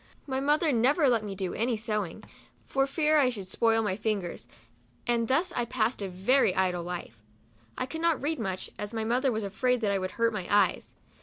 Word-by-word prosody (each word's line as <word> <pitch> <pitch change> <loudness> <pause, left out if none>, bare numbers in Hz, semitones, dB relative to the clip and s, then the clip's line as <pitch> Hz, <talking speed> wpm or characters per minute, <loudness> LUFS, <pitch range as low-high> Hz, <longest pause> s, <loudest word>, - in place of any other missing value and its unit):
My 265 -2 -2
mother 300 +3 +2
never 275 +6 +3
let 235 -4 +2
me 200 -2 -5
do 190 -2 -3
any 230 +1 0
sewing, 210 -5 -3 0.4
for 270 0 +1
fear 305 +1 +2
I 265 -3 +4
should 210 -6 -5
spoil 225 +3 +2
my 195 -3 0
fingers, 205 -4 -3 0.6
and 235 -1 +1
thus 335 +8 +1
I 245 - +1
passed 235 -1 -1
a 195 - -3
very 190 +3 +2
idle 180 -2 +1
life. 170 -10 -7 0.6
I - - -1
could 320 +5 -6
not 335 -3 +2
read 300 +1 -2
much, 190 -4 -4
as 205 +2 -4
my 220 - -1
mother 250 +4 +1
was 220 -1 -2
afraid 250 +6 0
that 210 -2 +1
I 195 - +1
would 185 0 -2
hurt 230 -1 +2
my 190 -4 -4
eyes. 200 -3 +2
225 Hz, 210 wpm, -28 LUFS, 195-265 Hz, 0.6 s, I